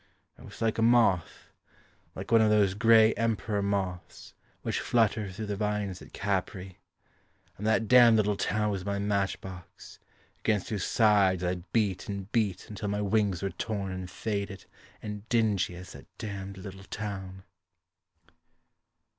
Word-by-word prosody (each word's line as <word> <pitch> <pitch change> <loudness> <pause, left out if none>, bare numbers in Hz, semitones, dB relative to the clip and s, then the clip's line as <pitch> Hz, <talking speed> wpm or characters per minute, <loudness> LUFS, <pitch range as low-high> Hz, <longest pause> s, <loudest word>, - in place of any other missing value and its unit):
I - - -18
was 110 -6 -12
like 110 0 0
a - - +2
moth 115 -7 +2 0.6
Like 95 +4 -7
one 115 -1 +6
of 110 - +4
those 105 -3 +3
grey 110 +1 +5
Emperor 110 -2 -1
moths 95 -3 -3 0.3
Which - - -1
flutter 110 -4 +1
through 105 +3 -6
the 105 -1 -3
vines 105 -2 -2
at - - -13
Capri. 95 -1 -3 0.8
And 105 - -4
that 110 0 +2
damned 120 -2 +7
little 105 -1 +2
town 105 +2 0
was 95 -2 -3
my 100 +1 -2
match 100 -1 0
box, 90 -2 -11 0.4
Against 105 -4 0
whose 105 -5 -2
sides 100 -5 +3
I 90 0 -1
beat 105 -5 0
and 100 0 -5
beat 105 -6 0
Until 105 0 -5
my 105 +1 -1
wings 100 -3 +1
were 95 - -1
torn 100 -4 -4
and 95 -1 -6
faded, 100 +1 -4 0.4
and 105 0 -7
dingy 105 -6 +1
As 90 +1 -10
that - - -12
damned 100 -2 -6
little 95 0 -9
town. 95 0 -6
100 Hz, 155 wpm, -29 LUFS, 95-110 Hz, 0.8 s, damned